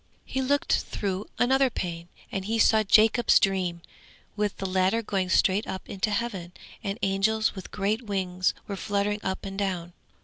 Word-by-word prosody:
Then - - -14
he 265 - +1
looked 285 +2 +2
through 195 0 -4
another 265 +2 +3
pane, 170 -6 -5 0.2
and 190 -1 -3
he 225 +2 0
saw 220 0 +5
Jacob's 220 +3 +5
dream, 180 -3 0 0.5
with 210 -1 -1
the 195 - -4
ladder 190 +4 +1
going 190 -3 -1
straight 195 +3 +3
up 190 - -6
into 195 +2 -1
heaven, 200 -5 -3 0.3
and 200 0 -3
angels 205 +3 +2
with 190 -3 -8
great 210 +3 -1
wings 185 -4 -1
were 200 - -4
fluttering 205 +1 -1
up 190 0 -3
and 195 0 -5
down. 180 -3 -2
200 Hz, 170 wpm, -27 LUFS, 190-220 Hz, 0.5 s, saw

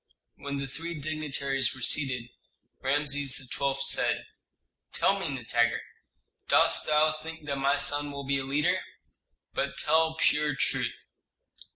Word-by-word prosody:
When 140 0 -4
the 140 - -3
three 160 +4 -6
dignitaries 140 -3 -1
were 130 - -10
seated, 125 -5 +2 0.5
Rameses 140 -1 +1
XII. 135 +1 -2
said, - - +1 0.7
"Tell 195 - +2
me, 190 - -3
Nitager, 120 -2 +1 0.7
dost - - +4
thou 155 +1 +4
think 155 0 -8
that 140 -1 -2
my 135 +1 +2
son 145 0 +1
will 140 0 -6
be 135 0 +1
a - - -3
leader? 140 +3 +1 0.7
But - - -2
tell 160 +1 +2
pure 150 -2 +2
truth." - - -1
140 Hz, 135 wpm, -28 LUFS, 135-155 Hz, 0.7 s, dost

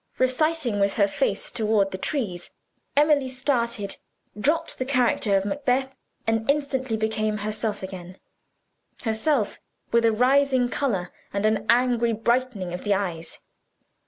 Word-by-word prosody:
'" - - -42
Reciting 255 -3 +1
with 200 0 +2
her 200 -2 +3
face - - -1
toward 210 -3 +1
the 190 - -4
trees, 195 - -2 0.5
Emily 290 -3 +4
started, 235 -6 -1 0.4
dropped 310 +10 0
the - - +1
character 245 -6 +2
of 195 - -1
Macbeth, 265 +3 0 0.3
and 225 +2 0
instantly 265 -5 0
became 215 -1 -1
herself 210 0 -3
again: 185 -1 -8 0.9
herself, 225 +1 0 0.3
with 235 0 +3
a 230 - +5
rising 260 +2 +3
color 200 -11 -1 0.2
and 200 +1 -1
an 215 0 +1
angry 240 -1 +3
brightening 225 -5 0
of 180 - -5
the 205 -1 +2
eyes. 175 -4 -4
225 Hz, 135 wpm, -25 LUFS, 205-260 Hz, 0.9 s, a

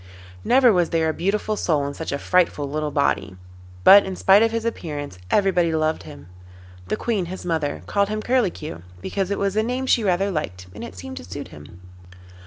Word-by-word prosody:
Never 250 - +5
was 175 -2 +2
there 160 -1 +1
a - - -1
beautiful 205 +5 -1
soul 155 -8 0
in 140 - -4
such - - -5
a 140 - -1
frightful 165 -3 +1
little 150 +1 -2
body, 140 -9 0 0.5
but 200 - +9
in 190 -1 -5
spite 195 +3 +5
of 225 - +4
his 230 0 -2
appearance 145 - -5
everybody 180 -5 +2
loved 155 0 0
him. 70 +1 -12 0.6
The - - -1
Queen, 210 -7 -1
his 185 +1 -7
mother, 150 - -2
called 200 - 0
him 215 0 -3
Curlicue, 195 - -1 0.2
because 190 - -3
it 200 - -1
was 200 0 -1
a 215 - +3
name 250 +4 -2
she 240 -3 +2
rather 195 +1 +1
liked, 90 - -4
and - - -8
it 90 - -8
seemed 90 -1 -8
to - - -7
suit 85 - -8
him. 75 +4 -13
175 Hz, 200 wpm, -22 LUFS, 145-200 Hz, 0.6 s, but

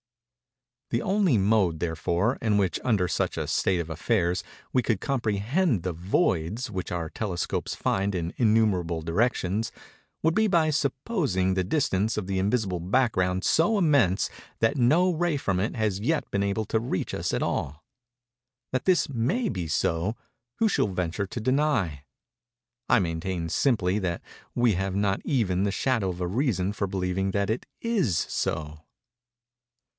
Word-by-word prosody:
_ - - -66 0.9
The 115 - 0
only 190 - +2
mode, 95 -5 +2
therefore, 85 - 0
in 110 -5 +2
which, 95 -3 +1
under 105 -8 +2
such - - -1
a - - -1
state 90 -2 +1
of 85 -1 -4
affairs, 90 +1 0 0.3
we 130 - +4
could 110 -4 0
comprehend 120 - 0
the 90 -2 -2
voids 95 - 0
which 95 -3 -4
our 85 -2 -2
telescopes 90 0 -3
find 100 +1 0
in 85 0 -3
innumerable 100 -8 +2
directions, 105 +3 0 0.5
would 160 +1 +3
be 220 +3 +3
by 165 -5 +3
supposing 135 - 0
the 95 0 +1
distance 110 - 0
of 105 - -2
the 95 0 -1
invisible 100 -2 0
background 95 -3 +1
so 175 +7 +3
immense 140 - +3 0.3
that 115 +5 +2
no 155 +8 +3
ray 170 -2 0
from 95 -9 -1
it 105 - -2
has 105 -4 0
yet 150 +9 0
been 100 - +1
able 100 +2 -1
to 110 - 0
reach 110 -5 -3
us - - -2
at - - 0
all. 70 +3 -3 0.9
That 130 - -1
this 180 -5 +3
may 140 - 0
be 90 - -3
so, 85 +7 0 0.4
who 225 - +2
shall 195 - +2
venture 95 +1 -2
to 120 - -5
deny? 115 - +1 0.9
I 120 - +5
maintain, 85 -1 -2
simply, 105 - +1
that 90 -4 -2 0.3
we 120 -2 +3
have 95 +1 -2
not 100 -1 +1
even 100 -9 +1
the 100 - +1
shadow 115 -3 0
of 90 -1 -5
a 90 - -1
reason 100 -3 0
for 100 -2 -2
believing 95 0 -1
that 100 +1 0
it 115 - -3
is 195 - +1
so. 75 -1 -2
100 Hz, 160 wpm, -26 LUFS, 90-125 Hz, 0.9 s, I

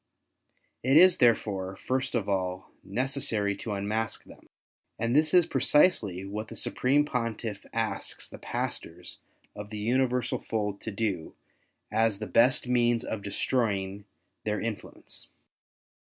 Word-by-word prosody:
It 135 +4 +4
is, 185 +2 +8
therefore, 100 -6 +2
first 130 +4 -2
of 110 -4 0
all, 95 -2 -2
necessary 110 -3 0
to 110 - -4
unmask 105 +2 -2
them; - - -17 0.5
and 115 +2 0
this 155 +1 +4
is 180 -2 +6
precisely 105 - +2
what 105 +2 -5
the - - -9
Supreme 140 +3 +2
Pontiff 115 -6 -3
asks 115 -1 -1
the - - -11
pastors 85 +2 -5 0.4
of 105 0 -7
the 105 - -6
Universal 125 +3 +1
Fold 105 -2 -2
to 110 - -4
do 100 -6 -3 0.6
as 110 -2 +2
the 110 - -5
best 120 +8 +3
means 120 -1 +2
of 110 - -4
destroying 100 -2 -1 0.4
their 105 0 -1
in 115 -1 -1
fluence. - - -13
110 Hz, 135 wpm, -28 LUFS, 100-125 Hz, 0.6 s, is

